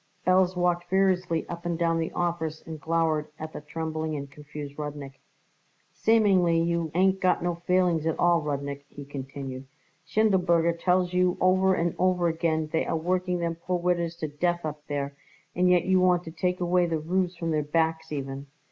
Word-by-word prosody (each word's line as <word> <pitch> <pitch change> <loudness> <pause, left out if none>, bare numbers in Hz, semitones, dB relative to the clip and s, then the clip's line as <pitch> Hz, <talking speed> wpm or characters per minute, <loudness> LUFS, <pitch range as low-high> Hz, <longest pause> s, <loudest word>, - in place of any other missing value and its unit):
Belz 185 0 +3
walked 175 0 +1
furiously 185 -3 +1
up 170 0 -7
and 170 -1 -2
down 165 -1 +1
the 160 - -2
office 165 -3 -2
and 160 -2 -8
glowered 160 -2 +1
at 155 0 -7
the - - -6
trembling 160 0 -4
and 140 -1 -6
confused 145 0 -9
Rudnik. 145 -2 -6 0.7
"Seemingly 195 -7 +3
you 170 -1 0
ain't 190 +1 +3
got 185 -2 +2
no 175 0 0
feelings 180 -3 +2
at 160 - 0
all, 175 -1 +3
Rudnik," 140 -1 -4
he 145 - -10
continued. 135 -1 -7 0.4
"Schindelberger 180 -6 +3
tells 180 0 +2
you 180 0 +2
over 185 +1 +4
and 170 -1 0
over 180 -1 +2
again 160 -1 0
they 160 - +2
are - - 0
working 180 +2 0
them 170 -1 -1
poor 175 +2 -2
widders 170 -1 0
to 160 -2 -4
death 175 +3 -1
up 150 -1 -5
there, 140 -1 -3 0.4
and 180 +1 +3
yet 180 -1 +4
you 185 0 +3
want 180 -1 +3
to 160 - -8
take 180 +3 -1
away 175 0 +2
the 165 -1 0
roofs 180 +3 -1
from 165 -1 -3
their 155 -1 +1
backs 160 +1 0
even." 135 -1 -5
170 Hz, 185 wpm, -27 LUFS, 155-180 Hz, 0.7 s, over